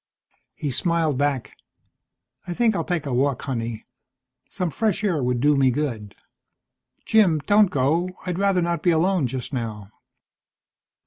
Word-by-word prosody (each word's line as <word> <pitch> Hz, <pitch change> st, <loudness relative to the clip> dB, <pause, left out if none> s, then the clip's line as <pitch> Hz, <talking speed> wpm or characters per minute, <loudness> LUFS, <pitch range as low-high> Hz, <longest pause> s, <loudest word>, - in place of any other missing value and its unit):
He 145 Hz, -, -3 dB
smiled 160 Hz, 0 st, 0 dB
back. 145 Hz, -3 st, -1 dB, 0.9 s
"I 175 Hz, -, -4 dB
think 225 Hz, -1 st, +2 dB
I'll -, -, -1 dB
take 175 Hz, -5 st, -2 dB
a 135 Hz, -, -3 dB
walk, 130 Hz, +1 st, 0 dB
honey. 115 Hz, -4 st, -4 dB, 0.6 s
Some 180 Hz, -3 st, -3 dB
fresh 215 Hz, +3 st, -1 dB
air 175 Hz, -8 st, +1 dB
would 125 Hz, -1 st, 0 dB
do 145 Hz, +3 st, +3 dB
me 135 Hz, -1 st, +4 dB
good." 120 Hz, -7 st, -3 dB, 0.9 s
"Jim, 205 Hz, -8 st, +4 dB
don't 205 Hz, +1 st, +5 dB
go. 155 Hz, +7 st, +1 dB, 0.2 s
I'd 180 Hz, -1 st, -3 dB
rather 195 Hz, -3 st, +2 dB
not 170 Hz, 0 st, -1 dB
be 180 Hz, -, +2 dB
alone 170 Hz, -2 st, +2 dB
just 130 Hz, +2 st, -6 dB
now." 110 Hz, -5 st, -5 dB
150 Hz, 145 wpm, -23 LUFS, 130-180 Hz, 0.9 s, don't